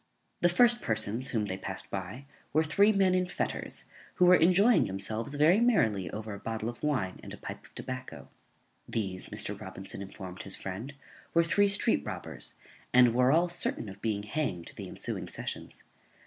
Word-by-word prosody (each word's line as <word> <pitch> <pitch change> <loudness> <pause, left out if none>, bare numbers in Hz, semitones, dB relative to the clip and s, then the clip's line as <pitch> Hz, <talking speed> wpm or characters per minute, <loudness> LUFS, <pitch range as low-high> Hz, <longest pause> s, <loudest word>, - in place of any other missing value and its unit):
_ - - -42
The 175 - +5
first 240 +6 +6
persons 110 +3 0
whom 110 -4 0
they 95 -1 -4
passed 95 0 -2
by 95 +8 -5 0.3
were 155 +2 +4
three 200 +7 +4
men 195 -3 +3
in 185 0 +1
fetters, - - -3 0.3
who 180 - +4
were 180 +1 +8
enjoying 190 +8 +4
themselves 110 +7 -1
very 155 +7 +5
merrily 110 - +2
over 110 +2 -6
a 100 - -7
bottle 110 +1 -3
of 120 - -9
wine 125 -12 -1
and - - -10
a - - -18
pipe - - -8
of - - -19
tobacco. 125 - -7 0.6
These, 95 -5 -3
Mr. - - -1
Robinson 95 +1 -6
informed 95 -2 -8
his 95 - -1
friend, 110 +9 -6 0.4
were 170 - +6
three 195 +4 +3
street 200 0 +3
robbers, - - -7 0.4
and 125 -2 +6
were 125 +2 +4
all 170 +4 +4
certain 175 -9 -2
of 100 +1 -12
being 105 -3 -1
hanged 105 - -3
the - - -7
ensuing - - -4
sessions. - - -7
120 Hz, 180 wpm, -30 LUFS, -, 0.6 s, were